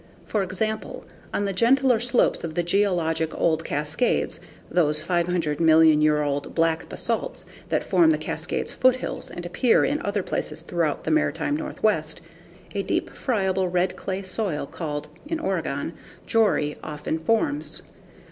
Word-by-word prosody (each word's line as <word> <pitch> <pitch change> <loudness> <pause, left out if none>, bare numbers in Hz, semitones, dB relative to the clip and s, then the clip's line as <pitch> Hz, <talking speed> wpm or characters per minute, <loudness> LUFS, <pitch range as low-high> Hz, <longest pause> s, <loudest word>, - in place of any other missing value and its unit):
For 210 - 0
example, 215 +4 -3 0.3
on 205 - -1
the 195 - -1
gentler 250 +3 +4
slopes 245 +1 +2
of 160 -2 -5
the 175 - +1
geologic 170 -4 +1
old 165 -1 +2
Cascades, 150 +12 0 0.3
those 155 -3 +2
50 170 -4 0
million 160 -1 +6
year 150 -1 +3
old 145 0 -3
black 165 -1 +1
basalts - - -3 0.2
that - - +1
form 330 -2 +4
the 315 - +3
Cascades - - -3
foothills 255 0 +1
and 175 - -7
appear 230 +7 +3
in 290 +2 0
other 200 -1 -1
places 155 -2 -3
throughout 165 -3 -1
the - - -1
maritime 310 -1 +1
Northwest, 205 - -1 0.5
a 200 - 0
deep, 340 - -1
friable, 190 -6 0
red 180 +1 0
clay 190 0 -4
soil 185 -6 -1
called 150 -1 -5 0.2
(in 325 +1 -2
Oregon) 315 - -2 0.3
Jori 210 -10 +2
often 155 +1 -3
forms. 290 - 0
180 Hz, 145 wpm, -24 LUFS, 160-225 Hz, 0.5 s, million